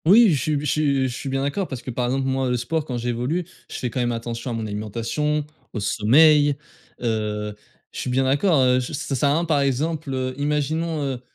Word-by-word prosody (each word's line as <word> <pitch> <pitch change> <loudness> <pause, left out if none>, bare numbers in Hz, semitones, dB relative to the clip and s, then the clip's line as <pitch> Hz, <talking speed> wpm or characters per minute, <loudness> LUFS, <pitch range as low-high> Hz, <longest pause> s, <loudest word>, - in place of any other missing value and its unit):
Oui, 205 +2 +7
je 140 - 0
suis 150 +1 0
je - - -4
suis 140 -2 +2
je 125 - -5
suis 135 - -5
bien 135 0 -1
d'accord 170 +7 -1
parce 125 -3 -6
que, 130 - -5
par 125 +1 -1
exemple, 135 +2 0
moi, 130 -1 0
le 125 - +1
sport 150 +6 -2
quand 125 -5 -3
j'évolue, 125 +8 -1 0.2
je - - -6
fais 125 - -3
quand 130 - -3
même 120 -1 +1
attention 115 +1 -4
à - - -2
mon 110 -1 -3
alimentation, 115 +9 -2 0.3
au 110 - -3
sommeil, 145 +8 +5 0.5
heu, 105 -2 -1 0.4
je - - -7
suis - - -3
bien 130 +2 +2
d'accord, 145 +5 +3
heu, 125 0 +4
je 125 +4 -5
ça 140 - -3
sert 140 +3 +2
à - - +3
rien, 165 +3 +1
par 155 -3 +2
exemple, 145 +2 -1
heu, 130 -1 -2
imaginons, 150 +2 0
heu, 130 -3 -3
135 Hz, 235 wpm, -23 LUFS, 120-150 Hz, 0.5 s, Oui